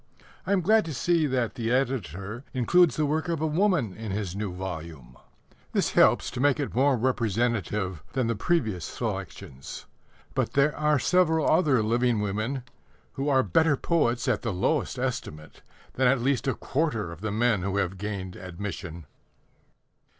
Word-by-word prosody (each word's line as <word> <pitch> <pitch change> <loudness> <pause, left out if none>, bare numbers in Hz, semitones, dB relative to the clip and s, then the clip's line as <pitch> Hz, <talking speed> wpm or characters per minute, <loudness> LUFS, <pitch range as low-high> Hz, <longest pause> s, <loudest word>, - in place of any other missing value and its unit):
I - - 0
am 195 -2 +3
glad 215 +5 +4
to 160 -3 -5
see 165 +2 +2
that 125 -5 -1
the 115 -1 -3
editor 120 - -2
includes 165 +5 +4
the 155 - +1
work 155 +3 -1
of 165 -2 -1
a 160 - 0
woman 160 - +1
in 110 +1 -7
his 95 -2 -3
new 100 -2 -3
volume. 80 -8 -7 0.6
This - - +1
helps - - +4
to 125 - -6
make 145 +1 +3
it 145 - -3
more 135 +2 +3
representative 110 - -1
than 130 -2 +1
the 115 - +1
previous 110 - 0
selections. 65 -1 -6 0.5
But - - -1
there 140 +2 +3
are 150 -1 +2
several 160 +3 +2
other 140 -10 +3
living 120 +1 +1
women 110 +6 -2 0.5
who 140 +2 -2
are 135 -2 +4
better 145 - +3
poets, 130 -9 +1
at - - +1
the 115 - -2
lowest 90 - 0
estimate, 75 0 -5 0.3
than 130 0 +2
at 135 +1 +3
least 130 0 0
a 135 - +1
quarter 125 - -1
of 85 +1 -10
the 110 -1 -2
men 110 -1 +2
who 100 +1 -2
have 95 -1 -1
gained 100 -3 -5
admission. 90 -2 -7
120 Hz, 165 wpm, -27 LUFS, 100-145 Hz, 0.6 s, glad